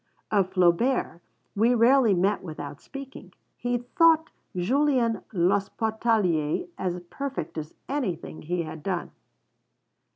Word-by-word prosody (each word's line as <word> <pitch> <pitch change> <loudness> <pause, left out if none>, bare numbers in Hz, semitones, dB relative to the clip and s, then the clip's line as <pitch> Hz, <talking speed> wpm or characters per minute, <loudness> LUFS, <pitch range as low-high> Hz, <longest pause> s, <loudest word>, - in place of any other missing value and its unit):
Of 195 -3 +2
Flaubert 180 +1 +2 0.3
we 230 +4 +4
rarely 235 -2 +5
met 190 +4 +1
without 145 -4 -7
speaking. 275 -1 -10 0.2
He 245 0 -1
thought 320 +6 +3 0.2
Julien 245 +4 +2
l'Hospitalier 200 - +1
as 180 -1 -2
perfect 275 - -4
as 155 -1 -6
anything 235 - -3
he 170 +2 -2
had 160 -1 -8
done. 180 +1 -3
205 Hz, 105 wpm, -26 LUFS, 175-250 Hz, 0.3 s, rarely